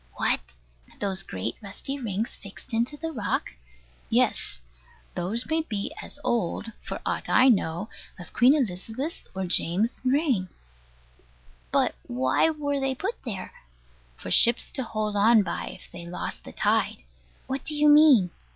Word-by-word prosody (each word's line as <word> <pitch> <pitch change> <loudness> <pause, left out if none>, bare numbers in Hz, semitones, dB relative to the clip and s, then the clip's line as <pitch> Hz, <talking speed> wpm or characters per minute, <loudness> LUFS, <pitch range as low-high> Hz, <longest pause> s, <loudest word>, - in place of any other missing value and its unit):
What? 60 - 0 0.4
Those 195 -2 +1
great 110 - -4
rusty 220 +7 -5
rings 220 -2 -2
fixed 200 +3 -12
into 235 +6 0
the 325 +2 -4
rock? 225 -9 -2 0.6
Yes. - - +2 0.5
Those 195 +7 -1
may 320 0 +1
be 230 -1 -4
as - - -5
old, 230 -2 -1
for - - -5
aught - - -2
I 260 - +6
know, 190 -3 +1 0.3
as 175 - -6
Queen 255 +4 +5
Elizabeth's 245 - -3
or 190 0 -2
James's 185 +7 +1
reign. 260 - +1 1.2
But - - +3
why 130 - +2
were 290 -2 -1
they 270 -1 0
put 395 - -4
there? 205 -6 -5 0.7
For - - -7
ships 235 0 +5
to 270 - -1
hold 215 -2 -2
on 215 +1 +6
by, 170 - -4
if - - -10
they 170 0 -9
lost 175 - -5
the - - -8
tide. - - +1 0.4
What 265 0 -3
do 305 - -4
you 300 0 +4
mean? 295 - +7
225 Hz, 150 wpm, -26 LUFS, 190-275 Hz, 1.2 s, mean